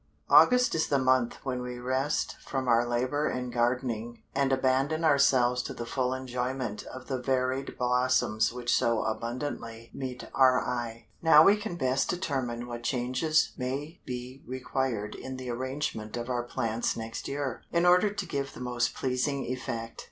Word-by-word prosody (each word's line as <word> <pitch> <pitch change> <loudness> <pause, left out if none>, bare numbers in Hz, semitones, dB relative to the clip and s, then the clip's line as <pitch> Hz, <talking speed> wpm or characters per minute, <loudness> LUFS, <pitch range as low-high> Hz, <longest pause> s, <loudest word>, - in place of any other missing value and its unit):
August 250 -1 +6
is 160 - +1
the 140 - +2
month 130 -2 +2
when 125 -2 -2
we 125 0 -5
rest 130 +4 -1
from 135 -2 -3
our 120 0 +4
labor 130 +5 0
in 125 -1 -3
gardening, 120 -1 -1
and 135 0 +1
abandon 135 +4 +1
ourselves 130 -4 +4
to - - -6
the 120 - -5
full 125 +1 -1
enjoyment 125 -3 -3
of 130 0 -9
the 130 -2 -2
varied 130 +1 -1
blossoms 125 -3 +2
which 120 0 0
so 115 -2 +2
abundantly 115 0 -4
meet 130 -2 -6
our 130 -1 +5
eye. 120 -2 -4 0.2
Now 160 -2 +8
we 200 +4 +6
can 210 -3 -5
best 130 -3 0
determine 130 -9 -2
what 120 -1 -6
changes 130 +6 +1
may 140 +6 -4
be 125 +1 -6
required 125 -4 -2
in 130 0 -7
the 130 -1 -5
arrangement 120 -3 -3
of 120 +1 -4
our 120 -1 0
plants 120 -2 -1
next 115 0 -5
year, 140 -3 -3
in 170 +1 +2
order 180 +3 +5
to 205 -2 -4
give 140 -4 -3
the - - -10
most 120 -1 -1
pleasing 135 +2 -1
effect. 115 -2 -4
130 Hz, 165 wpm, -29 LUFS, 120-135 Hz, 0.2 s, Now